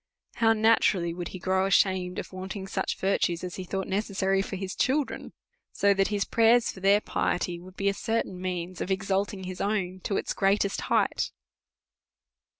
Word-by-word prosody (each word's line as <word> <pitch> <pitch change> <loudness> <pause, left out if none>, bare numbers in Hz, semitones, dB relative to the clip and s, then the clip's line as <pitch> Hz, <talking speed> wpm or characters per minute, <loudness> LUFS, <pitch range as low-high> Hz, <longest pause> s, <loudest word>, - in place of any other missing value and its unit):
How 225 -1 +4
naturally 215 -6 +3
would 175 0 -5
he 185 - -7
grow 190 +1 +1
ashamed 185 -2 +2
of - - -6
wanting 190 +1 -6
such 190 0 -2
virtues 185 -3 0
as 180 -1 -5
he 185 - -4
thought 190 +1 -3
necessary 195 -1 0
for 195 - -5
his 190 0 -5
children! 280 +2 0 0.4
So 200 0 +3
that 195 0 +2
his 205 -1 -1
prayers 230 +1 +4
for - - -12
their 200 +2 +4
piety 175 -3 -1
Avould 185 +1 -13
be 200 - -1
a 200 - +3
certain 195 -4 -2
means 180 -1 -4
of - - -3
exalting 195 +1 -1
his 185 0 -6
own 190 -3 -1
to 195 - 0
its - - -2
greatest 200 0 +1
height. - - +1
195 Hz, 175 wpm, -27 LUFS, 185-200 Hz, 0.4 s, How